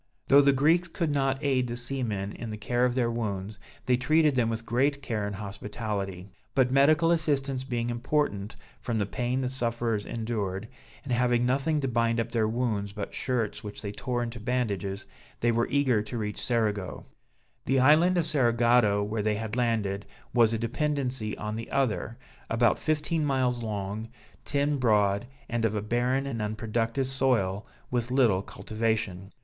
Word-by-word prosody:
Though 140 +1 +8
the 140 0 +5
Greeks 160 +6 +3
could 165 -2 -2
not 135 -1 +1
aid 130 -3 +2
the 120 0 -4
seamen 120 -6 -2
in 115 - -7
the 105 - -5
care 120 +4 +1
of 125 -1 0
their 120 -2 +1
wounds, 105 -3 -3 0.3
they 125 -1 +3
treated 155 +3 +3
them 120 -3 +2
with 115 0 -4
great 140 +5 +1
care 110 -5 -2
and 100 - -4
hospitality; 100 -1 -5 0.3
but 130 -2 +3
medical 155 +5 +5
assistance 140 -5 0
being 120 -2 -2
important, 120 -4 -1 0.2
from 115 -2 -2
the 105 - +1
pain 125 +5 -1
the 130 - -1
sufferers 115 -4 -1
endured, 110 -3 -3 0.4
and 135 -3 -2
having 120 0 +2
nothing 140 +5 +1
to 135 - 0
bind 115 -1 +1
up 115 - -2
their 110 -2 +1
wounds 110 -4 -1
but 105 -1 -5
shirts 120 -5 -1
which 105 +1 -8
they 100 - -3
tore 120 +3 -2
into 115 0 -5
bandages, 105 -5 -2 0.3
they 120 - +2
were 115 0 +1
eager 130 -6 +2
to 115 +3 -5
reach 105 -2 -3
Cerigo. 105 -5 -1 0.6
The 135 0 +2
island 160 +7 +5
of 170 - +2
Cerigotto, 120 -7 +3
where 105 +1 -2
they 105 0 +1
had 110 +1 -4
landed, 105 -5 0 0.3
was 115 -2 +5
a 115 - 0
dependency 130 -2 -2
on 105 0 -4
the 115 +1 -6
other, 120 -4 -1 0.3
about 115 0 +3
fifteen 155 +1 0
miles 130 -4 +1
long, 105 0 -4 0.4
ten 145 0 +1
broad, 105 -3 +2 0.2
and 120 -1 -2
of 110 -1 +1
a 105 - 0
barren 125 +4 +1
and 120 -5 -3
unproductive 115 +4 -1
soil, 125 -7 +1 0.2
with 120 -1 -1
little 120 -8 +3
cultivation. 105 -1 -3
120 Hz, 170 wpm, -28 LUFS, 105-130 Hz, 0.6 s, Though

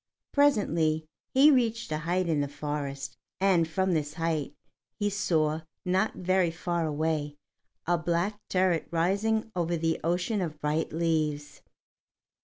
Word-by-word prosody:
Presently 170 - +2 0.3
he 280 +3 +7
reached 230 - +1
a 155 - 0
height 175 +3 0
in 155 -3 +1
the 145 - -1
forest, 140 -2 -5 0.2
and 185 -4 +3
from 190 +3 0
this 150 -2 -1
height, 160 -4 -2 0.4
he 205 -1 0
saw, 160 -6 +1 0.2
not 190 +4 +1
very 185 -1 +2
far 170 0 -2
away, 150 -1 -1 0.5
a 175 0 +2
black 175 +5 -1
turret 185 -3 +1
rising 200 +7 0
over 170 -1 0
the 165 0 0
ocean 180 +5 0
of 155 -4 -4
bright 150 +2 -1
leaves. 155 -3 -1
165 Hz, 135 wpm, -28 LUFS, 155-190 Hz, 0.5 s, he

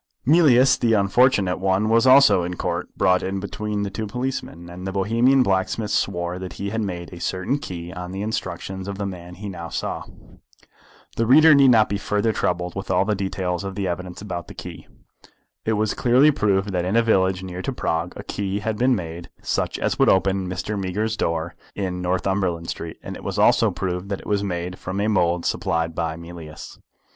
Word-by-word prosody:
Mealyus 135 -4 +5
the 115 -2 +2
unfortunate 100 -2 +3
one 95 +2 +1
was 115 +3 +4
also 135 -6 +7
in 90 +1 -3
Court, - - -3
brought 90 0 +3
in 95 +1 -2
between 105 +1 -3
two 110 +2 -4
policemen, 125 -7 -4
and 90 +2 -8
the - - -2
Bohemian 115 +7 +3
blacksmith 100 +1 0
swore 90 -1 -1
that 95 -1 -6
he 100 0 -4
had 110 0 -1
made 90 -4 -5
a 85 - -9
certain 95 +12 -1
key 90 - -7
on 90 -1 -6
the 95 +2 -4
instructions 95 -2 -4
of 100 -1 -5
the 100 - -3
man 90 -2 -7
he 105 +3 -7
now 85 -4 -6
saw. - - -3 1.2
The 115 - +1
reader 155 +5 +8
need 140 -2 +6
not 110 -3 +5
be 100 - -2
further 105 +2 0
troubled 90 -2 -1
with 95 - -6
all 95 +1 +2
the 105 - +1
details 95 -2 -2
of 95 -1 -5
the 100 -2 -2
evidence 90 +2 -5
about 90 -5 -5
the - - -11
key. - - -9 0.8
It 110 - +1
was 110 0 0
clearly 130 +5 +4
proved 100 -6 +1
that 90 -2 0
in 95 +4 -1
a 115 - +5
village 95 -4 +2
near 90 -1 -6
to 135 - -2
Prague 85 -8 -2
a - - -7
key 100 -1 -3
had 105 0 -3
been 125 +1 +4
made 85 -3 -6
such - - -1
as - - -1
would - - +5
open 95 -1 +2
Mr. 95 +3 -3
Meager's 105 +4 -1
door 85 -3 -2 0.2
in 90 -2 -3
Northumberland 90 -2 -1
Street, 80 -1 -7
and - - -6
it - - -10
was - - -4
also - - +4
proved 90 +1 -4
that 100 - -3
it - - -16
was 100 -1 0
made 90 -1 -4
from 95 +2 -4
a 105 - +1
mould 90 -5 +1
supplied 80 0 -1
by 80 0 -2
Mealyus. 85 -2 -10
95 Hz, 205 wpm, -23 LUFS, 90-105 Hz, 1.2 s, reader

